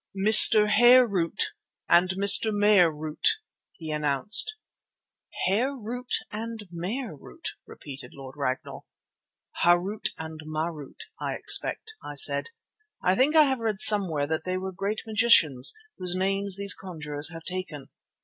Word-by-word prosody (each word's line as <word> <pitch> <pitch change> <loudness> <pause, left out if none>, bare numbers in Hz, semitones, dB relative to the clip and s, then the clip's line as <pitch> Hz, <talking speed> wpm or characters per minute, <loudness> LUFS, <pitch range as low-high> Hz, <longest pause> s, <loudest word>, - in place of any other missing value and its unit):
"Mr. 215 +1 +7
Hare 240 +4 +4
root 180 -7 -4 0.3
and 180 +1 +2
Mr. 200 +2 +6
Mare 205 -4 +2
root," 155 - -2 0.4
he 160 -3 -9
announced. 150 - +3 0.9
"Hare 240 +9 -1
root 245 +1 -10 0.2
and 220 -1 -8
Mare 185 - -7
root!" 65 - -11 0.2
repeated 135 -3 -12
Lord 135 -1 -12
Ragnall. 135 -3 -6 0.8
"Harût 175 +5 0
and 160 0 -10
Marût, 155 -2 -8 0.2
I - - -5
expect," 445 - -1
I - - -10
said. - - +3 0.5
"I 185 - +1
think 270 +9 0
I 310 - +6
have 265 -3 -2
read 220 -3 -4
somewhere 185 -10 +3
that 160 +2 -5
they 185 0 -5
were 190 +1 -7
great 200 +4 -6
magicians, 210 - +3 0.3
whose 180 -1 -2
names 195 +1 -1
these 200 0 -1
conjurers 150 -5 -7
have 165 -1 -12
taken." 180 -7 -8
185 Hz, 135 wpm, -24 LUFS, 155-215 Hz, 0.9 s, Mr